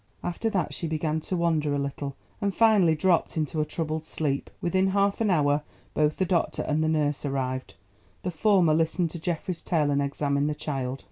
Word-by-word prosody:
After 175 +6 -1
that 190 -4 -1
she 165 - -3
began 155 0 -1
to 180 +4 -3
wander 155 -4 +1
a - - 0
little, 140 0 -3 0.3
and 200 -2 0
finally 205 -8 +5
dropped 170 0 +1
into 155 0 0
a - - 0
troubled 155 0 -3
sleep. 145 -3 -2
Within 185 +2 +1
half 200 +2 +1
an 220 - +2
hour 145 -4 +3 0.3
both 150 0 +1
the 190 - +1
doctor 175 -2 0
and 155 +1 0
the 160 - +1
nurse 150 -2 0
arrived. 130 -2 -3 0.5
The 180 - -1
former 180 -2 +3
listened 165 +1 +1
to 170 - -6
Geoffrey's 175 +1 -3
tale 150 -5 +1
and 140 0 +2
examined 140 +1 0
the 150 - -2
child. 135 -3 -3
155 Hz, 195 wpm, -27 LUFS, 145-180 Hz, 0.5 s, finally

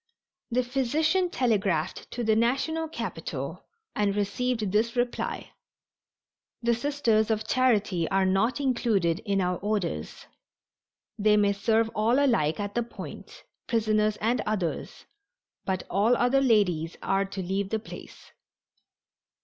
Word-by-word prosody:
The 250 +1 +1
physician 310 +8 +1
telegraphed 205 - 0
to 240 - -4
the 220 -1 +3
national 275 +8 +1
capital 320 - -5 0.3
and 205 -1 +1
received 215 +1 -1
this 225 +4 +1
reply: 245 0 -2 1.1
"The 235 0 +3
Sisters 235 -4 +1
of 215 0 -1
Charity 210 -10 +2
are 195 0 +2
not 195 +8 +1
included 220 - +1
in 200 -1 +1
our 180 -1 0
orders. 195 - -3 0.9
They 210 0 +4
may 205 -1 +3
serve 225 +2 +1
all 225 +4 +2
alike 230 - +2
at 205 0 -3
the 240 - +1
Point, 235 - -9 0.2
prisoners 215 -2 +1
and 235 +4 +1
others, 195 -6 -3 0.6
but 190 -1 -1
all 220 +5 +2
other 255 +3 +3
ladies 180 -10 +2
are 195 +1 +1
to 195 -1 -5
leave 190 +2 -2
the 220 - 0
place." 220 - -11
215 Hz, 125 wpm, -27 LUFS, 195-245 Hz, 1.1 s, They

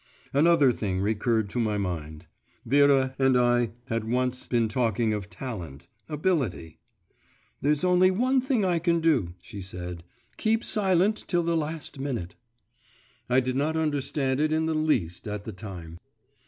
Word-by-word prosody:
Another 145 -2 +5
thing 95 -4 -2
recurred 110 +2 +1
to 125 - -2
my 110 -3 0
mind; 80 -4 -4 0.4
Vera 135 0 +4
and 135 -1 +4
I 120 -1 +2
had 115 -1 -2
once 125 +1 -1
been 120 -2 +2
talking 115 -1 0
of 100 -2 -4
talent, 85 - -7 0.2
ability. 150 - -1 0.8
'There's 150 +2 +2
only 180 0 +5
one 255 +7 +2
thing 250 -6 +1
I 175 -2 +2
can 170 0 +2
do,' 130 - +1
she 105 -4 -9
said; 90 -2 -7 0.3
'keep 225 +1 +1
silent 195 +1 +2
till 175 -2 +1
the 170 0 0
last 155 -2 -4
minute.' 120 -11 -3 1.0
I 125 +1 +4
did 130 0 -2
not 155 +4 0
understand 140 -3 0
it 155 +1 +1
in 160 +1 +1
the 160 - 0
least 125 - 0
at 105 -1 -4
the 110 - -7
time. 90 -5 -9
130 Hz, 155 wpm, -27 LUFS, 105-160 Hz, 1.0 s, Another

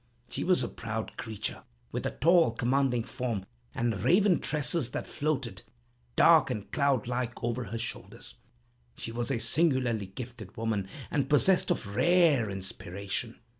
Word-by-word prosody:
She - - -2
was - - +3
a - - -1
proud - - -5
creature, 110 -2 -5 0.3
with - - -2
a - - -6
tall, 165 -4 +5
commanding 125 0 +1
form, 120 -6 -3 0.3
and 115 -5 -1
raven 180 - +4
tresses, 150 -2 +1
that - - -4
floated, 135 -9 -2 0.5
dark - - +6
and 105 -1 -4
cloud 140 -6 +2
like, 125 -1 -2
over 120 +1 -1
her 110 +4 -5
shoulders. 115 0 -5 0.6
She 115 - -5
was 120 +1 -3
a 135 - +1
singularly 120 - +1
gifted 115 -1 -9
woman, 110 -4 -1 0.2
and 135 -2 0
possessed 180 +6 +4
of 100 -3 -2
rare 165 - +4
inspiration. 100 +3 -5
120 Hz, 145 wpm, -29 LUFS, 110-140 Hz, 0.6 s, dark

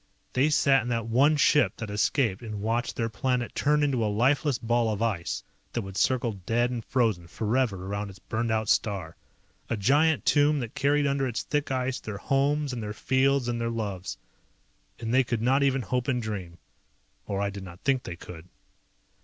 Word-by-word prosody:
They 135 +4 +3
sat 140 -3 +4
in 120 - -6
that 115 -2 -1
one 135 +7 +3
ship 145 -8 +3
that 110 -3 -5
escaped 105 0 +1
and 110 -3 -6
watched 115 +2 -1
their 115 - -1
planet 120 +2 -1
turn 150 +1 +2
into 130 -5 +1
a 105 - +1
lifeless 135 +5 +2
ball 115 -1 +1
of 105 - -3
ice 100 -7 -2 0.3
that 120 - -1
would 95 -1 -8
circle 125 +1 +1
dead 120 +2 +2
and 120 -2 -4
frozen 110 -10 0
forever 110 -1 -1
around 100 +1 -3
its 95 - -12
burned 115 +4 -3
out 110 -1 0
star. 95 -7 0 0.5
A 115 - -1
giant 145 +8 +3
tomb 145 0 +4
that 120 -4 -5
carried 145 +1 +2
under 140 -1 +1
its 120 - -3
thick 145 -1 -1
ice 130 0 -1
their 110 -2 -6
homes 140 +4 +1
and 120 - -4
their 105 -1 -4
fields 135 +1 +1
and 120 -1 -2
their 115 - 0
loves. 100 -5 -4 0.8
And 115 0 -3
they 130 +1 +5
could 115 -2 -2
not 135 +3 +3
even 135 -2 +2
hope 125 +4 -1
and 125 -3 +1
dream. 100 -7 -5 0.7
Or 100 -1 -2
I 100 0 0
did 100 0 -7
not 90 -1 -11
think 135 -2 +1
they 90 - -7
could. 85 0 -11
120 Hz, 195 wpm, -27 LUFS, 105-135 Hz, 0.8 s, they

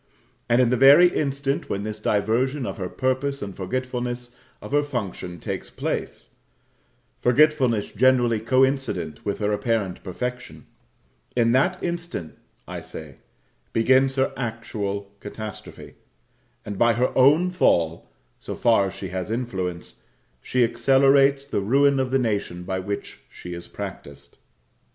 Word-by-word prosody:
And 120 +1 +4
in 125 -2 +3
the 125 - +2
very 140 +8 +8
instant 140 -1 -1
when 100 - -2
this 110 0 -5
diversion 120 +7 0
of - - -5
her 90 -1 -3
purpose 130 +3 -1
and 100 -2 -7
forgetfulness 125 +3 -4 0.2
of - - -10
her 145 +1 +3
function 100 - -5
take - - -4
place - - -4 0.9
forgetfulness 130 -4 +3
generally 120 -1 +3
coincident 130 - 0
with 100 - -2
her 105 -1 -1
apparent 105 -3 -1
perfection 125 +6 -6 0.7
in 115 -1 +3
that 140 +9 +2
instant, 170 - -4 0.3
I - - -6
say, 75 -4 -10 0.6
begins 130 +3 +3
her 135 0 +1
actual 105 -4 -4
catastrophe; 105 +1 -9 0.7
and 100 -2 -6
by 120 0 +5
her 125 +3 0
own 150 +8 +5
fall 85 - +1 0.3
so - - -6
far 115 -4 +3
as 95 - -7
she 95 - -6
has 95 +2 -4
influence 95 -7 -4 0.4
she 125 -1 +1
accelerates 135 +3 +4
the 140 -7 -2
ruin 140 +6 +3
of 130 -1 0
the 135 - +2
nation 100 -7 -2
by 95 +1 -3
which 100 +2 -5
she 90 - -9
is 85 0 -8
practised. 70 0 -9
120 Hz, 135 wpm, -24 LUFS, 100-135 Hz, 0.9 s, very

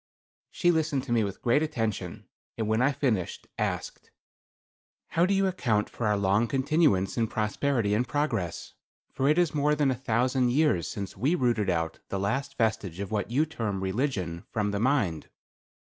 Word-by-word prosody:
She 175 - +2
listened 155 -5 0
to 125 - -7
me 115 -2 +3
with 100 -1 -5
great 125 +5 +3
attention, 115 -9 -3 0.3
and 110 -2 -1
when 110 +2 +2
I 130 - +5
had 140 -1 -1
finished, 110 - -1
asked: - - -3 1.0
"How 170 +2 +2
do 200 - +2
you 195 0 +2
account 120 - 0
for 120 - -2
our 105 -1 +2
long 100 +4 +2
continuance 135 - +2
in 115 - +2
prosperity 110 +1 0
and 120 +4 +1
progress, 120 - -2 0.4
for 135 +1 +1
it 155 - +3
is 175 -4 +2
more 150 0 +2
than 145 -2 +2
a - - 0
thousand 125 +1 +1
years 140 - +2
since 100 -2 -5
we 135 - +1
rooted 120 - +1
out 80 -2 -1
the 100 - -2
last 135 +8 -2
vestige 105 -6 -1
of 100 0 -4
what 105 -1 -1
you 140 +6 +2
term 110 -11 -3
religion, 95 - -2
from 105 -2 0
the 100 - -2
mind. 110 - 0
120 Hz, 180 wpm, -28 LUFS, 100-140 Hz, 1.0 s, I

